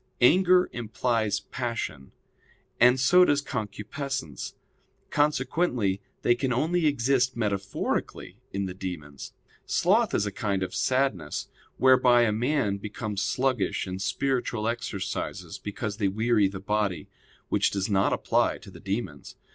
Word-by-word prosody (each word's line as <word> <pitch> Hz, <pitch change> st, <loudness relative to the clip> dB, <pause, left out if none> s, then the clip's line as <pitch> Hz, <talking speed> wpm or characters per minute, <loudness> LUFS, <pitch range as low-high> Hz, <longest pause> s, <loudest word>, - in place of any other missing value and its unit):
Anger 180 Hz, +7 st, +5 dB
implies 115 Hz, -3 st, -1 dB
passion, 115 Hz, -, -4 dB, 0.7 s
and 125 Hz, +2 st, +6 dB
so 180 Hz, +8 st, +6 dB
does 145 Hz, -5 st, +3 dB
concupiscence; 125 Hz, -, -5 dB, 0.6 s
consequently 145 Hz, -, +1 dB, 0.2 s
they 120 Hz, -, +5 dB
can 130 Hz, +1 st, -1 dB
only 160 Hz, +6 st, +1 dB
exist 130 Hz, -2 st, +1 dB
metaphorically 100 Hz, -3 st, -2 dB
in 100 Hz, 0 st, -2 dB
the 90 Hz, -, -5 dB
demons. 80 Hz, -7 st, -7 dB, 0.3 s
Sloth -, -, +2 dB
is 105 Hz, -, +1 dB
a 105 Hz, -, -2 dB
kind 100 Hz, -4 st, -1 dB
of 95 Hz, -, -5 dB
sadness, 100 Hz, -, 0 dB, 0.3 s
whereby 125 Hz, -2 st, +5 dB
a 110 Hz, -, +2 dB
man 120 Hz, -2 st, 0 dB
becomes 105 Hz, 0 st, -4 dB
sluggish 125 Hz, -2 st, 0 dB
in 95 Hz, 0 st, -5 dB
spiritual 120 Hz, +1 st, -1 dB
exercises 115 Hz, -4 st, -4 dB
because 105 Hz, 0 st, -4 dB
they 100 Hz, -3 st, +1 dB
weary 110 Hz, +1 st, +2 dB
the 95 Hz, 0 st, -6 dB
body; 100 Hz, -5 st, -1 dB, 0.4 s
which -, -, +2 dB
does 95 Hz, -1 st, -2 dB
not 95 Hz, -2 st, +2 dB
apply -, -, +1 dB
to -, -, -13 dB
the -, -, -12 dB
demons. 95 Hz, -8 st, -5 dB
110 Hz, 130 wpm, -27 LUFS, 100-130 Hz, 0.7 s, and